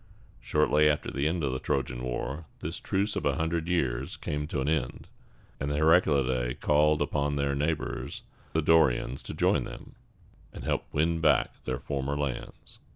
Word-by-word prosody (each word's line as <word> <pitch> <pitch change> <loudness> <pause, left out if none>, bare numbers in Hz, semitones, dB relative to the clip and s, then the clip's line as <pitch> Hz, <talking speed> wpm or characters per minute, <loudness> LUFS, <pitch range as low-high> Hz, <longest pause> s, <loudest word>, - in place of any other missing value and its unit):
Shortly 75 0 +3
after 75 - -1
the 70 +2 0
end 85 0 -1
of 70 - +1
the 65 - -2
Trojan 60 -3 -2
War, 65 +5 -3
this - - -4
truce 100 +2 -1
of - - -2
a - - +1
hundred 80 0 -1
years 65 -8 -1
came 75 0 -3
to 75 - -2
an 65 - -1
end; 75 -5 -1 0.5
and 70 - -2
the 75 - -1
Heraclidæ 70 -6 +3
called 75 0 +3
upon 70 0 -1
their 70 0 0
neighbors 75 +3 -2 0.3
the 80 - +1
Dorians 65 -5 +3
to - - -7
join - - +2
them, - - -9 0.6
and - - -9
help - - -1
them - - -6
win 80 +2 +2
back 75 -6 +2
their 65 -1 -1
former 70 +1 -3
lands. 70 -4 -5
75 Hz, 175 wpm, -28 LUFS, 65-80 Hz, 0.6 s, Shortly